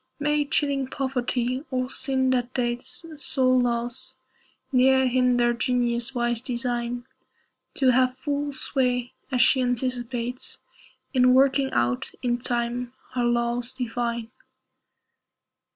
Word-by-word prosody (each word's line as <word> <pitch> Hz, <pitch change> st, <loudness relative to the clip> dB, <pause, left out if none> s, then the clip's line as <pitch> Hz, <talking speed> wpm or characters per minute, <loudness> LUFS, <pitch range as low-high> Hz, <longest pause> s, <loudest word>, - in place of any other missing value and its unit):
May 295 Hz, 0 st, +1 dB
chilling 280 Hz, -2 st, +1 dB
poverty, 255 Hz, -1 st, -1 dB
or 255 Hz, -1 st, -1 dB
sin 260 Hz, -1 st, +1 dB
that 250 Hz, -1 st, -1 dB
dates 250 Hz, +4 st, -2 dB
Soul 260 Hz, -2 st, +2 dB
loss, 240 Hz, 0 st, -2 dB, 0.6 s
ne'er 265 Hz, 0 st, +5 dB
hinder 250 Hz, -1 st, +3 dB
Genius' 240 Hz, +1 st, 0 dB
wise 240 Hz, -1 st, 0 dB
design 245 Hz, -1 st, -2 dB, 0.7 s
To 265 Hz, -2 st, +3 dB
have 255 Hz, 0 st, +2 dB
full 285 Hz, +1 st, -2 dB
sway 250 Hz, -2 st, 0 dB, 0.2 s
as 250 Hz, -1 st, +4 dB
she 260 Hz, -, +4 dB
anticipates 245 Hz, 0 st, -2 dB, 0.6 s
In 250 Hz, -1 st, +5 dB
working 270 Hz, 0 st, +3 dB
out, 120 Hz, +1 st, 0 dB
in 240 Hz, -1 st, +1 dB
time, 240 Hz, 0 st, -2 dB, 0.2 s
her 250 Hz, -1 st, 0 dB
laws 240 Hz, +1 st, 0 dB
divine. 235 Hz, -2 st, -3 dB
250 Hz, 110 wpm, -25 LUFS, 240-260 Hz, 0.7 s, ne'er